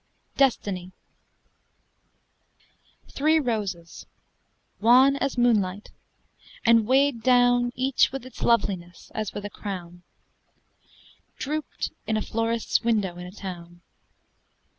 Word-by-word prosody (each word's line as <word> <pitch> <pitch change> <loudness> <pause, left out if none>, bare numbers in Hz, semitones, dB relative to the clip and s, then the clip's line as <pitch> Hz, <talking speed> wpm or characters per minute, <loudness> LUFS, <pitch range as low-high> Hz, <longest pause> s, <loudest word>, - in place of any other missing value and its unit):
] - - -45
DESTINY 190 -8 -1 2.2
Three 310 +3 +2
roses, 205 - -4 0.7
wan 255 +5 +6
as 275 -2 -2
moonlight, 210 -5 +1 0.7
and 230 -2 +5
weighed 270 -1 +3
down 245 0 +3
Each 260 +1 +2
with 270 -2 -6
its 255 - -12
loveliness 185 -7 -1
as 215 -2 -3
with 205 - -5
a 205 - -6
crown, 175 -5 -7 1.4
Drooped 305 +2 -4 0.2
in 220 0 +1
a - - -1
florist's 230 0 -1
window 210 -6 0
in 180 0 -8
a - - -10
town. 175 -3 -9
225 Hz, 105 wpm, -25 LUFS, 190-250 Hz, 2.2 s, wan